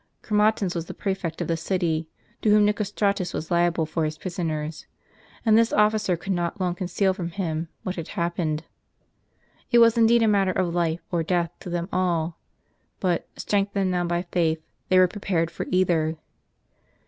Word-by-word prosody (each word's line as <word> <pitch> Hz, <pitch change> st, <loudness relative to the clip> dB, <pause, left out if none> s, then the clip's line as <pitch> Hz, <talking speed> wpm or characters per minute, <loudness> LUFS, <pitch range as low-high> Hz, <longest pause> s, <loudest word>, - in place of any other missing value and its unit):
Chromatins 210 Hz, -3 st, +2 dB
was 170 Hz, -1 st, -4 dB
the -, -, -7 dB
prefect 190 Hz, -5 st, -3 dB
of -, -, -2 dB
the 165 Hz, -, +1 dB
city, 165 Hz, -2 st, -1 dB, 0.3 s
to 215 Hz, -, +2 dB
whom 210 Hz, 0 st, +6 dB
Nicostratus 205 Hz, -2 st, 0 dB
was 160 Hz, -, -5 dB
liable 170 Hz, -1 st, +2 dB
for 160 Hz, +1 st, -2 dB
his 155 Hz, 0 st, -2 dB
prisoners; 160 Hz, -3 st, -4 dB, 0.6 s
and 220 Hz, -1 st, +5 dB
this 230 Hz, 0 st, +4 dB
officer 210 Hz, -3 st, +2 dB
could 190 Hz, +4 st, -3 dB
not 175 Hz, +2 st, -2 dB
long 180 Hz, -2 st, 0 dB
conceal 185 Hz, +2 st, 0 dB
from 180 Hz, -3 st, -4 dB
him 165 Hz, -3 st, -3 dB, 0.2 s
what 185 Hz, 0 st, -4 dB
had 165 Hz, -, -4 dB
haiDpened. 170 Hz, -3 st, -1 dB, 1.1 s
It 240 Hz, -, +4 dB
w^as 230 Hz, 0 st, +6 dB
indeed 230 Hz, +1 st, +5 dB
a -, -, +4 dB
matter 195 Hz, -3 st, +3 dB
of 180 Hz, -2 st, 0 dB
life 170 Hz, -1 st, 0 dB
or 170 Hz, -2 st, +1 dB
death 170 Hz, 0 st, 0 dB
to -, -, -8 dB
them 175 Hz, 0 st, -2 dB
all; 170 Hz, -3 st, 0 dB, 0.6 s
but, 180 Hz, -3 st, 0 dB
strength 200 Hz, -1 st, -1 dB
ened 195 Hz, -2 st, +1 dB
now 180 Hz, -1 st, 0 dB
by 175 Hz, 0 st, -1 dB
faith, 165 Hz, -2 st, +1 dB, 0.3 s
they 185 Hz, -, +5 dB
were 185 Hz, 0 st, +7 dB
prepared 175 Hz, -4 st, -1 dB
for -, -, -5 dB
either. 170 Hz, -4 st, +2 dB
180 Hz, 175 wpm, -25 LUFS, 165-200 Hz, 1.1 s, were